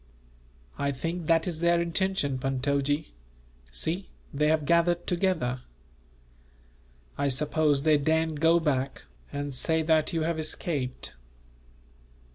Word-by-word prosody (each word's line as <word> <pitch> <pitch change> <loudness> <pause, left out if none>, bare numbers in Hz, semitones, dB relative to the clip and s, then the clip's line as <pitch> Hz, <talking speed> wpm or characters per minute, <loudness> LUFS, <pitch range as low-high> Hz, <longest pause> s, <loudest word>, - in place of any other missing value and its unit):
"I 140 0 +1
think 165 +4 -4
that 165 -1 +4
is 165 -3 -3
their 170 0 +3
intention, 170 -5 0
Puntojee. 140 +3 0 0.6
See, 165 - -1 0.2
they 150 +2 +2
have 155 -1 +2
gathered 170 +2 +2
together! 170 -9 0 1.6
I 140 - +2
suppose 145 +1 +1
they 155 -2 +4
daren't 160 +1 +1
go 165 +2 +5
back, 140 -4 -1 0.3
and 145 0 -4
say 160 +5 +1
that 155 -1 +2
you 165 -2 0
have 165 0 -1
escaped." 150 -4 -3
155 Hz, 115 wpm, -28 LUFS, 140-170 Hz, 1.6 s, go